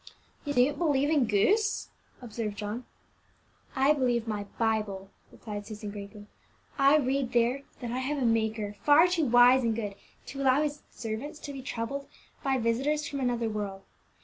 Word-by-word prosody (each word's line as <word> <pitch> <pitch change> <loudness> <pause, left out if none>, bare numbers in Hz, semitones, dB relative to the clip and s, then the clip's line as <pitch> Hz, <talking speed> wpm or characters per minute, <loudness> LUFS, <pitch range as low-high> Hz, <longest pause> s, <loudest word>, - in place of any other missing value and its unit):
"You 285 - -2
don't 275 +4 +3
believe 290 -3 +2
in 285 -7 +3
ghosts," 410 - +2 0.3
observed 215 -3 -4
John. 215 +4 -4 0.9
"I 270 +3 +4
believe 245 -5 0
my 210 -2 -3
Bible," 210 -4 -1 0.2
replied 205 -2 -7
Susan 210 -1 -7
gravely; 205 0 -9 0.5
"I 275 +2 +6
read 265 -3 0
there 240 +3 +2 0.2
that 240 -2 -4
I 250 - -2
have 280 +3 -2
a 265 - 0
Maker 220 -2 0
far 295 +3 +7
too 350 -5 +1
wise 245 +2 +6
and 230 -2 0
good 210 -3 -3 0.3
to 275 +1 -6
allow 270 +2 +4
His 295 0 -3
servants 230 +7 -5
to 285 - -6
be 270 - -7
troubled 265 +2 -4 0.4
by 270 -1 +1
visitors 265 +6 0
from 280 - -4
another 240 -3 0
world. 205 -3 -4
245 Hz, 165 wpm, -29 LUFS, 220-280 Hz, 0.9 s, far